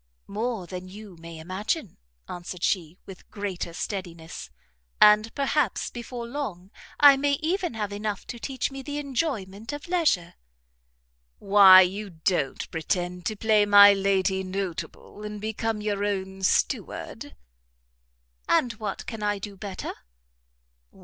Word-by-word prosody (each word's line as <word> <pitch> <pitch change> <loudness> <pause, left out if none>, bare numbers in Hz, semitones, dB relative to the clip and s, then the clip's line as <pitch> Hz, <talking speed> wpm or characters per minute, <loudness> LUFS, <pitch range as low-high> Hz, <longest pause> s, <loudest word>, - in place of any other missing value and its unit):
"More 220 -1 -3
than 180 +1 -8
you 205 -1 -11
may 165 0 -10
imagine," 190 - -4 0.3
answered 175 0 -7
she, 170 -2 0
with 190 -2 -13
greater 195 -4 -4
steadiness; 165 - -6 0.5
"and 210 +1 +6
perhaps 280 -4 0
before 240 0 -7
long 220 -8 -6 0.3
I 285 -1 +9
may 285 +1 +1
even 335 - -1
have 210 -2 -3
enough 205 -1 -4
to 235 - -7
teach 265 +2 -3
me 270 0 -7
the 290 +2 -5
enjoyment 240 -7 -3
of 290 +3 -7
leisure." 315 - +1 1.0
"Why 195 -2 +8
you 195 +3 -1
don't 160 -4 -1
pretend 175 +2 -2
to 215 - -2
play 215 0 +3
my 205 0 +9
Lady 195 -1 +1
Notable, 190 +1 -6
and 210 0 -6
become 220 0 -3
your 205 -1 -1
own 190 -1 -3
steward?" 190 - -1 1.1
"And 240 -2 +3
what 215 -2 -5
can 225 -3 -7
I 205 0 0
do 200 0 -8
better?" 195 -1 -6
205 Hz, 130 wpm, -26 LUFS, 185-230 Hz, 1.1 s, I